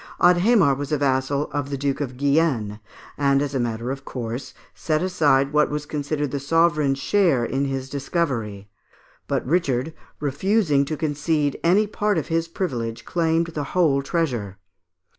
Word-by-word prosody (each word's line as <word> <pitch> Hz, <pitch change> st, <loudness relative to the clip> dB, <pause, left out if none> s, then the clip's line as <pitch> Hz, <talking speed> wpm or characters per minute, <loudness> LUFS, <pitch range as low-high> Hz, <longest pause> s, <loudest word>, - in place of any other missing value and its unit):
Adhémar 180 Hz, -, +4 dB
was 145 Hz, +2 st, -5 dB
a 150 Hz, -, +2 dB
vassal 140 Hz, +1 st, 0 dB
of 145 Hz, -1 st, -3 dB
the 140 Hz, -, -3 dB
Duke 140 Hz, +1 st, -1 dB
of 130 Hz, -3 st, -4 dB
Guienne, 140 Hz, -7 st, +1 dB, 0.4 s
and, 140 Hz, -1 st, +3 dB
as 145 Hz, 0 st, -2 dB
a 135 Hz, -, 0 dB
matter 120 Hz, +1 st, -2 dB
of 135 Hz, 0 st, -6 dB
course, 125 Hz, +1 st, -6 dB, 0.2 s
set 155 Hz, +1 st, -1 dB
aside 145 Hz, -6 st, +2 dB
what 150 Hz, 0 st, +3 dB
was 150 Hz, 0 st, -3 dB
considered 145 Hz, -1 st, -3 dB
the 140 Hz, -, -2 dB
sovereign's 150 Hz, -1 st, +2 dB
share 150 Hz, -5 st, +2 dB
in 135 Hz, +3 st, -1 dB
his 135 Hz, -1 st, -3 dB
discovery; 130 Hz, -, -2 dB, 0.6 s
but -, -, -1 dB
Richard, 140 Hz, -1 st, 0 dB, 0.3 s
refusing 150 Hz, +1 st, +1 dB
to 155 Hz, +2 st, -4 dB
concede 150 Hz, -1 st, -1 dB
any 190 Hz, +6 st, +4 dB
part 210 Hz, -1 st, -1 dB
of 155 Hz, -, -3 dB
his 165 Hz, 0 st, 0 dB
privilege, 120 Hz, -10 st, -4 dB
claimed 165 Hz, -1 st, +1 dB
the 150 Hz, -, -2 dB
whole 145 Hz, -6 st, +3 dB
treasure. 125 Hz, -, -2 dB
145 Hz, 160 wpm, -23 LUFS, 135-165 Hz, 0.6 s, Adhémar